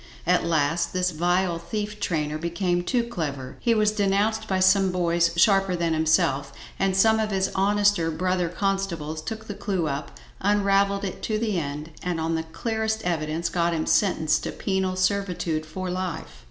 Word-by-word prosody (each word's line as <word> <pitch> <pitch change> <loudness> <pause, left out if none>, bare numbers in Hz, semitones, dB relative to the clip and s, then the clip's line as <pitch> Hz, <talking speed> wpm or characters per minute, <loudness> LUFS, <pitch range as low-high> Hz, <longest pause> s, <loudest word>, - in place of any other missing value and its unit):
At 180 +1 +3
last 160 0 +1
this 185 0 +1
vile 175 +1 +1
thief 210 +3 -4
trainer 155 -4 -1
became 175 +1 -1
too 240 +6 +1
clever; 145 - -5
he 230 -1 +2
was 215 -1 +3
denounced 210 +2 +1
by 190 -2 0
some 190 0 +4
boys 170 -1 +2
sharper 195 0 +4
than 170 -1 0
himself, 155 -3 +2 0.3
and 195 -1 +1
some 220 +2 +5
of 215 -1 0
his 190 -1 0
honester 200 -3 +2
brother 180 +2 0
constables 175 -5 -2
took 220 +7 -6
the 205 - -5
clue 195 -4 -2
up, 140 -1 -5 0.2
unravelled 200 0 +2
it 190 - -6
to 215 - -1
the 215 -4 0
end, 150 +1 -5
and 180 -2 -2
on 160 +1 -1
the 160 - 0
clearest 220 +6 -2
evidence 165 -1 -1
got 170 -1 0
him 160 - -1
sentenced 160 -6 +2
to - - -4
penal 190 -1 -1
servitude 180 -5 -1
for 185 +3 -4
life. 180 - -5
185 Hz, 170 wpm, -25 LUFS, 165-200 Hz, 0.3 s, some